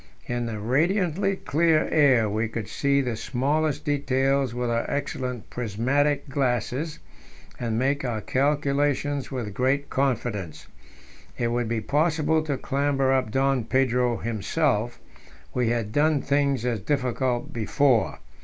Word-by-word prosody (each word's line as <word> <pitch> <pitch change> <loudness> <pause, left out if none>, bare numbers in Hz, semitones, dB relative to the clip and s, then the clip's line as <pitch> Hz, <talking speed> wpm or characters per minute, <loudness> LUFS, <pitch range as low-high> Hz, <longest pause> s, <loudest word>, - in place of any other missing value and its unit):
In 120 -1 -2
the 110 -2 -4
radiantly 175 - +1
clear 160 -2 +2
air 135 -8 +4
we 110 +2 -1
could 110 -2 -5
see 140 0 +1
the 125 -4 -2
smallest 150 +6 -1
details 135 -2 +1
with 120 0 -2
our 115 0 -1
excellent 125 -4 -4
prismatic 130 +6 0
glasses, 135 +3 -1 0.6
and 115 -2 -1
make 140 +4 +1
our 120 -4 -2
calculations 145 +2 0
with 120 -6 -4
great 135 +5 0
confidence. 115 - -2 0.7
It 120 - 0
would 120 0 -1
be 115 -1 -1
possible 155 +4 +1
to 145 -3 -1
clamber 135 -1 +1
up 130 -3 +1
Don 135 +1 +1
Pedro 125 -2 +1
himself; 120 +1 -1 0.5
we 125 -2 +1
had 115 -3 -1
done 150 +3 +3
things 140 -3 +1
as 120 -3 0
difficult 125 0 -1
before. 120 +2 +2
130 Hz, 130 wpm, -25 LUFS, 120-145 Hz, 0.7 s, air